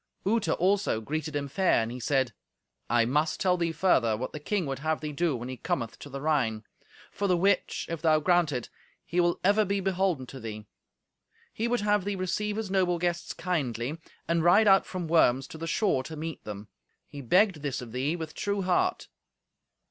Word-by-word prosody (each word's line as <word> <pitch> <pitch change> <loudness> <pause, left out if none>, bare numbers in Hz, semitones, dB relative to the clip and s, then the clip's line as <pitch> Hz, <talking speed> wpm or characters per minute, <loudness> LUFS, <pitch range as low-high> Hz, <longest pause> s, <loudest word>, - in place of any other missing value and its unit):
Uta, 205 -5 +1
also, 190 - +1
greeted 155 +6 -4
him 145 -1 -1
fair, 185 +7 +2
and 115 - -4
he 125 - -6
said, 130 -1 0 0.6
"I 120 0 +3
must 150 +6 0
tell 185 -2 +3
thee 170 -2 0
further 140 - +2
what 130 +3 -4
the 150 - -5
king 190 +4 -1
would 135 -1 -4
have 155 +1 -1
thee 150 -1 -4
do 160 0 0
when 120 0 -5
he 130 0 -6
cometh 115 0 -3
to 145 - -9
the 140 0 -6
Rhine; 135 -8 0 0.5
for 200 - -2
the 180 -2 +3
which, 195 +2 +1
if 165 -2 -5
thou 155 -2 +4
grant 175 -1 +3
it, 125 -4 -4 0.3
he 175 - -1
will 175 0 +2
ever 205 +3 +4
be 200 0 -1
beholden 185 -7 0
to 135 +1 -10
thee. 110 -2 -7 0.9
He 225 - -1
would 240 -1 0
have 205 -1 +2
thee 200 +1 -2
receive 200 +3 -2
his 215 -3 -4
noble 185 -2 +2
guests 175 0 -2
kindly, 145 -5 -2 0.3
and 170 -1 +1
ride 195 +6 +5
out 195 -1 +5
from 180 -3 -4
Worms 135 -5 +3
to 160 - -9
the 165 - -4
shore 175 -5 +1
to 160 - -7
meet 160 +1 -6
them. 105 0 -7 0.4
He 145 0 -9
begged 180 - +3
this 140 -3 -2
of 120 -2 -8
thee 135 +7 -1
with 160 -2 -6
true 200 -1 -2
heart." 180 -1 +1
160 Hz, 205 wpm, -28 LUFS, 135-185 Hz, 0.9 s, ride